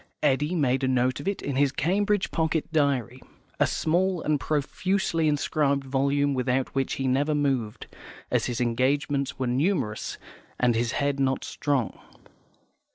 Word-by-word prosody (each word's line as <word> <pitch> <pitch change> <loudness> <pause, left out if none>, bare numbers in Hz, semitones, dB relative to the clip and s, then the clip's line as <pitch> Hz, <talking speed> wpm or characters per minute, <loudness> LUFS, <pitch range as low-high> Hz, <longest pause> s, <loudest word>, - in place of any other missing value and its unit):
Eddy 150 +4 +2
made 135 -4 +1
a - - +2
note 130 0 +1
of - - -7
it 200 - -2
in 140 -2 -2
his 140 -1 +3
Cambridge 200 +7 0
Pocket 160 0 -1
Diary, 135 -5 0 0.4
a - - +4
small 180 +3 +1
and 150 -1 +1
profusely 165 +4 0
inscribed 145 -1 +1
volume 140 +1 +1
without 130 0 0
which 135 -1 0
he 135 - -2
never 145 +4 +1
moved, 135 -7 -1 0.5
as - - +1
his 120 -2 -3
engagements 135 +4 0
were 130 - -1
numerous, 130 - -1 0.4
and 125 -1 +3
his 115 +2 0
head 140 -1 0
not 135 -1 +1
strong. 140 -7 -2
140 Hz, 150 wpm, -26 LUFS, 130-155 Hz, 0.5 s, a